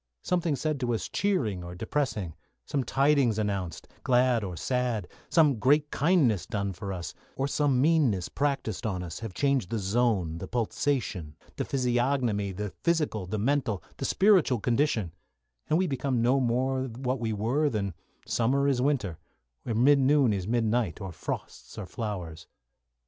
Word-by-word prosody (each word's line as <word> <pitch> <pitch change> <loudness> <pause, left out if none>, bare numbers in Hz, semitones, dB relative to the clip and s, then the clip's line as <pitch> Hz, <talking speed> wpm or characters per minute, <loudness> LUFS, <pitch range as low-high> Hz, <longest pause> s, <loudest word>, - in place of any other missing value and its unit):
Something 170 -4 +1
said 155 0 -2
to 120 -2 0
us - - -4
cheering 120 - 0
or 90 0 -7
depressing; 110 - -2 0.3
some 140 - -1
tidings 135 -3 +2
announced, 100 -6 -3 0.2
glad 125 -2 +3
or 90 -3 -5
sad; 120 -1 -1 0.2
some 150 -6 +4
great 145 +5 +3
kindness 145 - +2
done 100 -2 -2
for 95 +2 -6
us, 90 -2 -5 0.2
or 135 +2 0
some 140 -2 +1
meanness 135 - +3
practised 135 -7 -2
on 90 -4 -2
us 85 -1 -6
have 110 -5 -7
changed 135 -7 +1
the 115 - -1
zone, 100 -5 0
the - - -6
pulsation, 115 - -1 0.2
the - - -1
physiognomy, 120 -5 0
the 105 +1 -4
physical, 150 - 0
the 110 - -2
mental, 115 - 0
the - - -3
spiritual 190 - +4
condition, 115 - +1 0.6
and 155 - +3
we 185 - +2
become 135 -4 -1
no 125 +4 +3
more 130 +2 0
what 130 +1 -3
we 115 -1 -1
were 120 +9 +1
than 100 -6 -2 0.3
summer 135 +4 +1
is 130 -3 +2
winter, 125 - 0 0.5
or 115 - -1
midnoon 135 0 +4
is 95 -2 -3
midnight, 115 -4 0
or 95 -3 -5
frosts - - -6
are - - -5
flowers. 90 -6 -5
120 Hz, 155 wpm, -28 LUFS, 100-140 Hz, 0.6 s, some